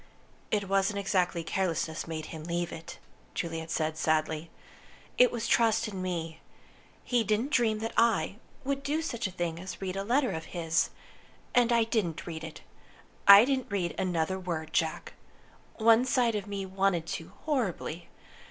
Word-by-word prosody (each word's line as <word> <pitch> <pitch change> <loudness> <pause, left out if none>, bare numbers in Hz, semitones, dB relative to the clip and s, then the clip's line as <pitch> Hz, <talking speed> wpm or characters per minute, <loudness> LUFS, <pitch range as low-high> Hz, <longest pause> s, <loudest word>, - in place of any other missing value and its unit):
"It 205 -2 0
wasn't 195 +1 +1
exactly 185 -4 0
carelessness 165 -3 -1
made 160 -1 -4
him 160 -1 -7
leave 170 0 -2
it," 165 - -8 0.4
Juliet 165 -1 -3
said, 155 0 -1
sadly. 155 +1 0 0.7
"It 250 - +7
was 235 -2 -3
trust 225 -1 +3
in 195 -3 -5
me. 165 -3 -3 0.6
He 245 -2 +1
didn't 220 +6 0
dream 230 -5 +3
that 225 - -3
I 210 -5 +2 0.3
would 275 0 -1
do 295 +3 -1
such 235 -8 -2
a - - -8
thing 170 -2 -3
as 185 +1 -7
read 190 -1 -3
a 195 - -2
letter 250 +5 +2
of 160 0 -5
his. 165 -1 +1 0.6
And 245 -1 +4
I 235 -1 +4
didn't 210 -8 -1
read 160 -2 -6
it. 160 -1 -8 0.7
I 200 +3 +11
didn't 260 -4 -1
read 185 -4 -1
another 185 0 -1
word, 160 -4 -4
Jack. 160 -1 -1 0.6
One 230 +1 +5
side 245 -3 +2
of 210 -1 -3
me 200 -1 -4
wanted 190 -3 0
to, 165 0 -6
horribly. 190 - -2
190 Hz, 160 wpm, -29 LUFS, 165-225 Hz, 0.7 s, I